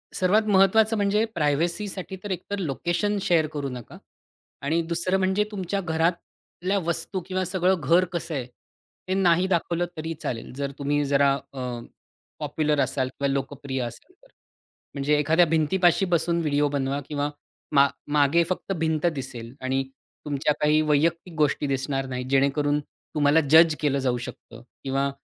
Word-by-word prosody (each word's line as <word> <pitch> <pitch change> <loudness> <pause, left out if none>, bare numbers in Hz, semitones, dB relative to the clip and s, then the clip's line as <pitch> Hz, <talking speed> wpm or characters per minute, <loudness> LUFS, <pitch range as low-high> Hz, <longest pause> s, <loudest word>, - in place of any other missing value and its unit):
सर्वात 200 +4 +3
महत्वाचं 210 +3 +4
म्हणजे 205 +2 +2
प्रायव्हसीसाठी 170 +6 -1
तर 205 - -5
एकतर 200 +2 -4
लोकेशन 175 +6 -1
शेअर 165 -4 +2
करू 145 -2 -3
नका 125 -3 -9 0.6
आणि 160 +4 +1
दुसरं 175 +3 +1
म्हणजे 190 +2 +2
तुमच्या 195 -1 -2
घरातल्या 170 +3 -2
वस्तू 170 +2 -2
किंवा 185 -1 -1
सगळं 185 +1 +2
घर 170 +6 +4
कसं 170 -1 -3
आहे, 130 -3 -3 0.6
ते 185 - 0
नाही 180 -1 +3
दाखवलं 175 -1 0
तरी 160 +1 -3
चालेल. 115 -1 -4
जर 140 0 -3
तुम्ही 145 +1 +1
जरा 140 0 +3 0.2
अ, 130 - -6 0.8
पॉप्युलर 150 0 0
असाल 130 -2 0
किंवा 140 +1 -2
लोकप्रिय 135 -1 -3
असाल 120 - -9
तर. - - -20 0.7
म्हणजे 145 +1 +1
एखाद्या 160 +4 +4
भिंतीपाशी 170 +4 +2
बसून 170 0 +1
व्हिडिओ 145 -2 +1
बनवा 140 0 -1
किंवा 145 -1 -1 0.4
मा 140 0 +6 0.3
मागे 150 +3 +4
फक्त 185 +1 -3
भिंत 160 0 0
दिसेल 120 -3 -7
आणि 135 +1 0 0.4
तुमच्या 145 0 0
काही 150 +1 +4
वैयक्तिक 160 +4 +1
गोष्टी 145 -1 +1
दिसणार 135 0 -1
नाही, 125 -1 -4
जेणेकरून 140 +2 +2
तुम्हाला 145 +1 0
जज 160 0 +7
केलं 140 -2 +1
जाऊ 125 -2 0
शकतं 115 0 -11 0.2
किंवा 135 +1 0
155 Hz, 145 wpm, -25 LUFS, 140-180 Hz, 0.8 s, जज